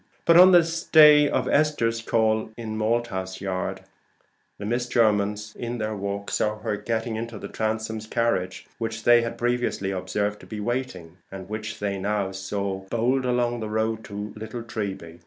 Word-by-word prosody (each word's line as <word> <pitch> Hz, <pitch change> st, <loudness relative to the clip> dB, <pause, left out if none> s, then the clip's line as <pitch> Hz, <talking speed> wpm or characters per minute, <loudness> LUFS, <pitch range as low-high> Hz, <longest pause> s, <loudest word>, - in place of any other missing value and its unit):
But 170 Hz, -, +5 dB
on 180 Hz, +2 st, +9 dB
this 170 Hz, -1 st, +3 dB
day 150 Hz, -2 st, +7 dB
of -, -, 0 dB
Esther's 130 Hz, -7 st, +1 dB
call 110 Hz, -1 st, +1 dB
in 110 Hz, -2 st, -5 dB
Malthouse 110 Hz, -4 st, -1 dB
Yard, 95 Hz, -1 st, -3 dB, 0.8 s
the 100 Hz, -, -6 dB
Miss 120 Hz, +3 st, -1 dB
Jermyns 105 Hz, -2 st, +1 dB
in 120 Hz, 0 st, -4 dB
their 110 Hz, -1 st, -3 dB
walk 100 Hz, 0 st, -4 dB
saw 105 Hz, 0 st, 0 dB
her 105 Hz, -1 st, -2 dB
getting 110 Hz, +2 st, -2 dB
into 115 Hz, 0 st, -5 dB
the -, -, -7 dB
Transomes' 110 Hz, 0 st, -3 dB
carriage, 95 Hz, -6 st, -1 dB
which 115 Hz, -1 st, -4 dB
they 120 Hz, +1 st, +6 dB
had 115 Hz, 0 st, -4 dB
previously 120 Hz, -5 st, -1 dB
observed 100 Hz, +3 st, -2 dB
to -, -, -14 dB
be 110 Hz, -, -6 dB
waiting, 105 Hz, -7 st, -4 dB
and 95 Hz, -1 st, -8 dB
which 105 Hz, 0 st, -5 dB
they 100 Hz, -2 st, -2 dB
now 100 Hz, 0 st, -1 dB
saw 95 Hz, 0 st, -3 dB
bowled 125 Hz, +3 st, +1 dB
along 120 Hz, -1 st, +1 dB
on 120 Hz, -, -4 dB
the 110 Hz, -1 st, -4 dB
road 110 Hz, +1 st, -1 dB
toward 105 Hz, 0 st, -7 dB
Little 110 Hz, +2 st, -6 dB
Treby. 95 Hz, -7 st, -5 dB
110 Hz, 175 wpm, -25 LUFS, 100-120 Hz, 0.8 s, on